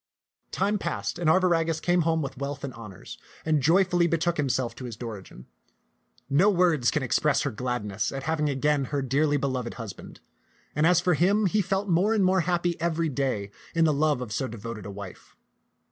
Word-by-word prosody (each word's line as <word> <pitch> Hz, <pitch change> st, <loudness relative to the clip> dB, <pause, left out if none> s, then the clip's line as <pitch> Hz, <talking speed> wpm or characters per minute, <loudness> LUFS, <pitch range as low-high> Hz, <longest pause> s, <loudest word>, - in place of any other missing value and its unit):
Time 205 Hz, +2 st, 0 dB
passed, -, -, -3 dB
and 170 Hz, -3 st, +2 dB
Arviragus 165 Hz, -2 st, +2 dB
came 175 Hz, +1 st, +2 dB
home 160 Hz, -1 st, +1 dB
with 135 Hz, -, -5 dB
wealth 140 Hz, 0 st, -4 dB
and 135 Hz, -2 st, -5 dB
honors, 105 Hz, -5 st, -10 dB, 0.3 s
and 155 Hz, -2 st, +2 dB
joyfully 175 Hz, +3 st, +3 dB
betook 170 Hz, +1 st, 0 dB
himself 130 Hz, -4 st, 0 dB
to 130 Hz, -, -9 dB
his 115 Hz, -4 st, -7 dB
Dorigen. 105 Hz, -, -8 dB, 0.8 s
No 170 Hz, +9 st, +4 dB
words 170 Hz, -, +3 dB
can 150 Hz, -, -1 dB
express 140 Hz, +4 st, +2 dB
her 140 Hz, -, -1 dB
gladness 110 Hz, -3 st, -3 dB
at 135 Hz, -1 st, -5 dB
having 155 Hz, -1 st, 0 dB
again 145 Hz, 0 st, +1 dB
her 140 Hz, +1 st, -2 dB
dearly 145 Hz, +3 st, +2 dB
beloved 130 Hz, -3 st, -2 dB
husband; 110 Hz, -5 st, -9 dB, 0.6 s
and 150 Hz, +2 st, +3 dB
as 180 Hz, -1 st, +5 dB
for 180 Hz, 0 st, +2 dB
him, 200 Hz, +7 st, +3 dB
he 205 Hz, +3 st, +2 dB
felt 195 Hz, +2 st, -1 dB
more 190 Hz, +5 st, +2 dB
and 200 Hz, -3 st, +3 dB
more 185 Hz, 0 st, +3 dB
happy 175 Hz, -1 st, -1 dB
every 165 Hz, -1 st, 0 dB
day 130 Hz, -8 st, -2 dB, 0.2 s
in 165 Hz, 0 st, +4 dB
the 155 Hz, -, +3 dB
love 150 Hz, -2 st, +1 dB
of 120 Hz, -4 st, -6 dB
so 130 Hz, +4 st, -1 dB
devoted 110 Hz, -2 st, -7 dB
a -, -, -6 dB
wife. 100 Hz, -2 st, -10 dB
150 Hz, 190 wpm, -26 LUFS, 125-175 Hz, 0.8 s, as